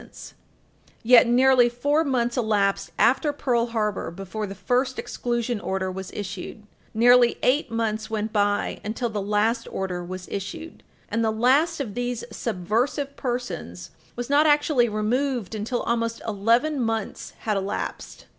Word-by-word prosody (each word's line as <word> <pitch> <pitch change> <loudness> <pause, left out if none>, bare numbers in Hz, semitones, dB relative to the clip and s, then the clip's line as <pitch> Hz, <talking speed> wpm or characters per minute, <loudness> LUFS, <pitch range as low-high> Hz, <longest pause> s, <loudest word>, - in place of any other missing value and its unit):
[Footnote - - -17
3/14] - - -10 0.7
Yet 240 0 +7
nearly 250 0 +5
four 285 +6 +1
months 245 -5 0
elapsed 210 -5 +1
after 280 +4 +3
Pearl 245 -5 0
Harbor 215 -3 -2
before 195 +4 -5
the 195 - -7
first 250 +7 0
exclusion 240 -1 -2
order 190 -1 -2
was 190 0 -6
issued; 200 +1 -6 0.3
nearly 240 +1 +5
eight 275 +1 +2
months 220 -1 -2
went 215 0 -3
by 205 -1 0
until 225 +3 -2
the 210 -2 -3
last 215 +3 0
order 180 -2 -3
was 185 +1 -7
issued, 200 +12 -6 0.3
and 230 0 0
the 220 - +2
last 270 +9 +2
of 240 -8 -4
these 245 0 -3
"subversive" 235 - -1
persons 185 - -5 0.2
was 245 0 -4
not 290 +2 +4
actually 290 -5 +3
removed 235 +1 -1
until 220 +3 -2
almost 230 -1 -1
eleven 230 +8 +2
months 225 -3 -3
had 215 -2 -1
elapsed. 195 0 -4
230 Hz, 145 wpm, -24 LUFS, 205-250 Hz, 0.7 s, Yet